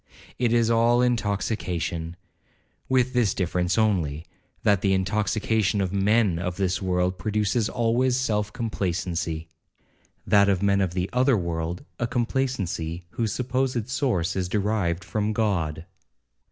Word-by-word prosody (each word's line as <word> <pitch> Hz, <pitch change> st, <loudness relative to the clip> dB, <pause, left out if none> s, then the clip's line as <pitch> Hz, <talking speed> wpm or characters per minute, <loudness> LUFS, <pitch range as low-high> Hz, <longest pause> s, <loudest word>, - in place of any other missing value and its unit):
It 120 Hz, -2 st, +2 dB
is 115 Hz, -1 st, +3 dB
all 120 Hz, +2 st, +4 dB
intoxication, 95 Hz, -7 st, -1 dB, 0.7 s
with 130 Hz, 0 st, +2 dB
this 120 Hz, -6 st, +2 dB
difference 90 Hz, 0 st, 0 dB
only, 85 Hz, -9 st, +1 dB, 0.4 s
that 100 Hz, -3 st, +3 dB
the 95 Hz, -1 st, +2 dB
intoxication 105 Hz, +2 st, +1 dB
of 95 Hz, -1 st, -1 dB
men 100 Hz, -2 st, +2 dB
of 90 Hz, 0 st, -3 dB
this 95 Hz, -1 st, 0 dB
world 90 Hz, -1 st, 0 dB
produces 105 Hz, +3 st, 0 dB
always 120 Hz, +2 st, +1 dB
self 105 Hz, -5 st, 0 dB
complacency—that 90 Hz, -2 st, -2 dB
of 95 Hz, -1 st, +1 dB
men 100 Hz, 0 st, +3 dB
of 90 Hz, -2 st, -1 dB
the 90 Hz, 0 st, 0 dB
other 130 Hz, 0 st, +3 dB
world, 85 Hz, -1 st, -3 dB
a 120 Hz, -, 0 dB
complacency 115 Hz, -, -2 dB
whose 115 Hz, -3 st, -1 dB
supposed 125 Hz, -1 st, -1 dB
source 115 Hz, -, 0 dB
is 90 Hz, -2 st, -1 dB
derived 100 Hz, -4 st, 0 dB
from 105 Hz, +4 st, -1 dB
God. 85 Hz, -8 st, -1 dB
100 Hz, 125 wpm, -25 LUFS, 90-115 Hz, 0.7 s, all